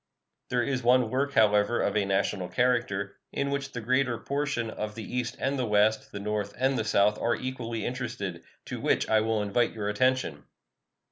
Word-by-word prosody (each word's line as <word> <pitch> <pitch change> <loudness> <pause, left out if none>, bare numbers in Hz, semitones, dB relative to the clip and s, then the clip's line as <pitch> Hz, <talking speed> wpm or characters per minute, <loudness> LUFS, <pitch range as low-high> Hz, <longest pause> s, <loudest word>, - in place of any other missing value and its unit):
There 125 -1 +1
is 130 0 -1
one 125 -1 +3
work, 140 +2 0
however, 105 +1 +4
of 100 - 0
a 105 -2 +2
national 95 -1 0
character, 120 -5 0
in 140 0 -1
which 140 0 -2
the 115 - -5
greater 130 +1 +1
portion 140 -5 -2
of 105 0 -5
the 115 - -6
East 125 -1 -1
and 135 +1 0
the 125 - 0
West, 105 +1 +2
the 100 - -6
North 105 0 -3
and 130 +2 +2
the 110 - 0
South, 105 0 +3
are 120 - +1
equally 120 -3 -4
interested, 120 -9 -4 0.2
to - - -6
which - - +1
I 110 -1 +4
will 110 -1 0
invite 110 +4 +1
your 105 -2 -3
attention. 125 - 0
115 Hz, 190 wpm, -28 LUFS, 105-130 Hz, 0.2 s, however